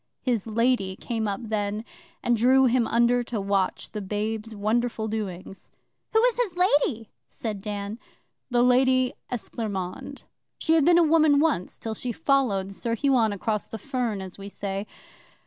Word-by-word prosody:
His 235 Hz, -5 st, 0 dB
Lady 225 Hz, -4 st, +1 dB
came 225 Hz, +1 st, -3 dB
up 200 Hz, -1 st, -3 dB
then, 210 Hz, 0 st, -2 dB, 0.4 s
and 240 Hz, -, +3 dB
drew 260 Hz, +4 st, +5 dB
him 245 Hz, -1 st, +3 dB
under 240 Hz, +1 st, +3 dB
to 230 Hz, -2 st, -3 dB
watch 195 Hz, -1 st, -1 dB
the 210 Hz, -, -4 dB
babe's 215 Hz, +2 st, -3 dB
wonderful 220 Hz, +2 st, 0 dB
doings.' 195 Hz, -3 st, -5 dB, 0.4 s
'Who 445 Hz, -, +4 dB
was 485 Hz, +1 st, +3 dB
his 420 Hz, -8 st, 0 dB
Lady?' 285 Hz, -, +2 dB, 0.2 s
said 210 Hz, -4 st, -5 dB
Dan. 205 Hz, +1 st, -5 dB, 0.5 s
'The 240 Hz, -1 st, +3 dB
Lady 255 Hz, 0 st, +4 dB, 0.2 s
Esclairmonde. 205 Hz, -6 st, -5 dB, 0.3 s
She 320 Hz, -, +1 dB
had 320 Hz, -3 st, +4 dB
been 345 Hz, 0 st, +6 dB
a 345 Hz, -, +6 dB
woman 310 Hz, -2 st, +4 dB
once, 295 Hz, -, 0 dB
till 225 Hz, -, -4 dB
she 245 Hz, +2 st, -3 dB
followed 245 Hz, -10 st, +1 dB
Sir 230 Hz, +4 st, -2 dB
Huon 245 Hz, -4 st, +2 dB
across 210 Hz, +1 st, -2 dB
the 225 Hz, -, -6 dB
fern, 235 Hz, -3 st, -2 dB
as 190 Hz, +1 st, -10 dB
we 200 Hz, +1 st, -7 dB
say. 200 Hz, 0 st, -4 dB
225 Hz, 160 wpm, -26 LUFS, 205-255 Hz, 0.5 s, been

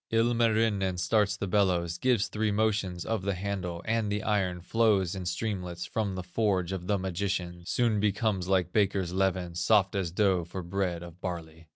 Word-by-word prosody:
Ilmarinen 115 Hz, -4 st, +2 dB
starts 100 Hz, +2 st, +2 dB
the 100 Hz, -, -2 dB
bellows, 90 Hz, -3 st, +1 dB
Gives 120 Hz, -3 st, +2 dB
three 110 Hz, 0 st, -1 dB
motions 100 Hz, -4 st, 0 dB
of 115 Hz, -3 st, -1 dB
the 100 Hz, 0 st, -1 dB
handle, 90 Hz, -3 st, -4 dB
And 110 Hz, -2 st, 0 dB
the 105 Hz, 0 st, -1 dB
iron 95 Hz, -4 st, 0 dB
flows 100 Hz, -2 st, +2 dB
in 95 Hz, -2 st, -5 dB
streamlets 90 Hz, -2 st, -3 dB
From 105 Hz, -4 st, -2 dB
the 95 Hz, -, -4 dB
forge 95 Hz, -1 st, 0 dB
of 90 Hz, -2 st, -4 dB
the 100 Hz, -, +2 dB
magician, 90 Hz, -2 st, -3 dB
Soon 115 Hz, -4 st, +1 dB
becomes 100 Hz, -2 st, 0 dB
like 95 Hz, -2 st, +1 dB
baker's 95 Hz, -4 st, +1 dB
leaven, 95 Hz, -2 st, 0 dB
Soft 95 Hz, +2 st, +3 dB
as 95 Hz, -4 st, -1 dB
dough 95 Hz, 0 st, +2 dB
for 90 Hz, +2 st, -6 dB
bread 90 Hz, -1 st, -2 dB
of 85 Hz, +1 st, -12 dB
barley. 80 Hz, -2 st, -6 dB
95 Hz, 175 wpm, -29 LUFS, 90-105 Hz, -, Soft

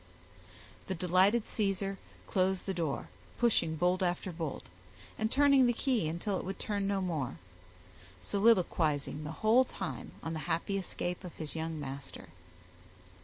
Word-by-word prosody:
The 190 Hz, -, -2 dB
delighted 185 Hz, +6 st, +3 dB
Caesar 195 Hz, -2 st, -1 dB, 0.3 s
closed 190 Hz, 0 st, +1 dB
the 195 Hz, -, -1 dB
door, 165 Hz, -6 st, -2 dB, 0.3 s
pushing 200 Hz, -9 st, +2 dB
bolt 180 Hz, +4 st, +2 dB
after 180 Hz, +1 st, 0 dB
bolt, 160 Hz, -4 st, -4 dB, 0.5 s
and 220 Hz, 0 st, 0 dB
turning 275 Hz, -2 st, +6 dB
the 240 Hz, -, +3 dB
key 245 Hz, -, +1 dB
until 175 Hz, +5 st, -1 dB
it -, -, -5 dB
would 190 Hz, +1 st, -4 dB
turn 200 Hz, -2 st, -1 dB
no 200 Hz, -1 st, +1 dB
more, 160 Hz, -9 st, -2 dB, 0.8 s
soliloquizing 165 Hz, -, +2 dB
the 150 Hz, -, -4 dB
whole 235 Hz, +4 st, +7 dB
time -, -, -6 dB
on 165 Hz, -, -3 dB
the 160 Hz, -, -3 dB
happy 195 Hz, +4 st, 0 dB
escape 180 Hz, 0 st, -4 dB
of 180 Hz, -, -8 dB
his 155 Hz, -1 st, -5 dB
young 160 Hz, -1 st, -3 dB
master. 140 Hz, -1 st, -7 dB
185 Hz, 145 wpm, -32 LUFS, 160-200 Hz, 0.8 s, whole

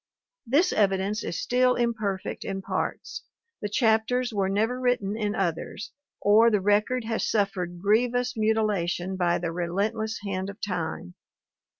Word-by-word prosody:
This 305 Hz, +10 st, +3 dB
evidence 200 Hz, +1 st, +1 dB
is -, -, -3 dB
still 250 Hz, 0 st, +2 dB
imperfect 215 Hz, -5 st, -2 dB
in 195 Hz, -1 st, -4 dB
parts, -, -, -3 dB, 0.4 s
the 210 Hz, -, -2 dB
chapters 230 Hz, +2 st, +1 dB
were 195 Hz, -2 st, 0 dB
never 220 Hz, +6 st, 0 dB
written 245 Hz, -5 st, 0 dB
in 210 Hz, -1 st, -1 dB
others, 185 Hz, +2 st, -3 dB, 0.3 s
or 215 Hz, +3 st, +5 dB
the 210 Hz, -3 st, +2 dB
record 210 Hz, +5 st, +1 dB
has 225 Hz, 0 st, -1 dB
suffered 190 Hz, -4 st, -1 dB
grievous 245 Hz, +6 st, +1 dB
mutilation 205 Hz, -5 st, 0 dB
by 175 Hz, -2 st, +1 dB
the 170 Hz, -1 st, -3 dB
relentless 205 Hz, +6 st, -2 dB
hand 190 Hz, -1 st, -3 dB
of 200 Hz, -, -9 dB
time. 165 Hz, -, -4 dB
210 Hz, 135 wpm, -26 LUFS, 190-225 Hz, 0.4 s, or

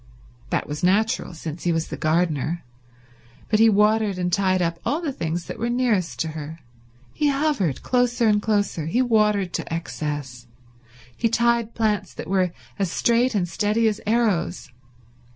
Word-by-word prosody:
That -, -, -1 dB
was 150 Hz, 0 st, -5 dB
natural, 205 Hz, +1 st, +1 dB
since 160 Hz, 0 st, -7 dB
he 175 Hz, -, +2 dB
was 165 Hz, -1 st, -1 dB
the -, -, -4 dB
gardener, 160 Hz, 0 st, 0 dB, 0.9 s
but 215 Hz, -, +3 dB
he 225 Hz, 0 st, +7 dB
watered 210 Hz, -1 st, +3 dB
and 180 Hz, -1 st, -1 dB
tied 185 Hz, -1 st, +2 dB
up 170 Hz, -1 st, -1 dB
all 300 Hz, -, 0 dB
the 325 Hz, -5 st, -2 dB
things 170 Hz, -4 st, -3 dB
that -, -, -7 dB
were 235 Hz, +2 st, -1 dB
nearest 240 Hz, -8 st, 0 dB
to 160 Hz, -, -1 dB
her; 155 Hz, 0 st, -7 dB, 0.6 s
he 300 Hz, -, +1 dB
hovered 275 Hz, -, 0 dB
closer 245 Hz, -1 st, +2 dB
and 210 Hz, -1 st, +3 dB
closer; 205 Hz, -7 st, 0 dB
he 240 Hz, +10 st, +2 dB
watered 210 Hz, -6 st, +2 dB
to -, -, -4 dB
excess; 145 Hz, -6 st, -4 dB, 0.7 s
he 230 Hz, -, +1 dB
tied 235 Hz, 0 st, +1 dB
plants 210 Hz, -4 st, 0 dB
that -, -, -7 dB
were 185 Hz, -1 st, +1 dB, 0.3 s
as 195 Hz, -3 st, +1 dB
straight 235 Hz, +3 st, +2 dB
and 180 Hz, -3 st, +1 dB
steady 210 Hz, +6 st, +1 dB
as 215 Hz, -1 st, -1 dB
arrows. 210 Hz, -, 0 dB
200 Hz, 165 wpm, -23 LUFS, 170-230 Hz, 0.9 s, he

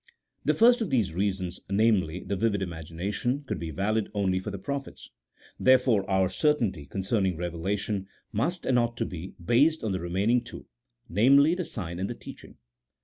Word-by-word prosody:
The -, -, +2 dB
first 240 Hz, +1 st, +5 dB
of 215 Hz, -, -1 dB
these 110 Hz, -10 st, +1 dB
reasons, 95 Hz, -1 st, -2 dB
namely, 100 Hz, -5 st, +2 dB
the 100 Hz, -, -2 dB
vivid 100 Hz, -1 st, 0 dB
imagination, 90 Hz, -, -3 dB
could 105 Hz, -8 st, -4 dB
be 85 Hz, -, -5 dB
valid 100 Hz, +6 st, -1 dB
only 95 Hz, -2 st, +1 dB
for 95 Hz, -, -5 dB
the 100 Hz, -, -5 dB
prophets; 140 Hz, +6 st, -6 dB, 0.5 s
therefore, 125 Hz, -6 st, +4 dB
our 95 Hz, -1 st, +3 dB
certainty 110 Hz, -, 0 dB
concerning 95 Hz, -, -1 dB
revelation 95 Hz, +4 st, -2 dB, 0.2 s
must, 165 Hz, -, -1 dB
and 125 Hz, -2 st, +3 dB
ought 120 Hz, 0 st, -1 dB
to -, -, 0 dB
be, 90 Hz, +1 st, -7 dB
based 140 Hz, -, +3 dB
on 110 Hz, -, -1 dB
the 95 Hz, -, -1 dB
remaining 100 Hz, +8 st, +1 dB
two -, -, -10 dB, 0.3 s
— -, -, -56 dB
namely, 140 Hz, -, +5 dB
the 180 Hz, -1 st, -2 dB
sign 85 Hz, -5 st, -5 dB
and 95 Hz, -, -2 dB
the -, -, -4 dB
teaching. -, -, -12 dB
100 Hz, 175 wpm, -27 LUFS, 95-120 Hz, 0.5 s, first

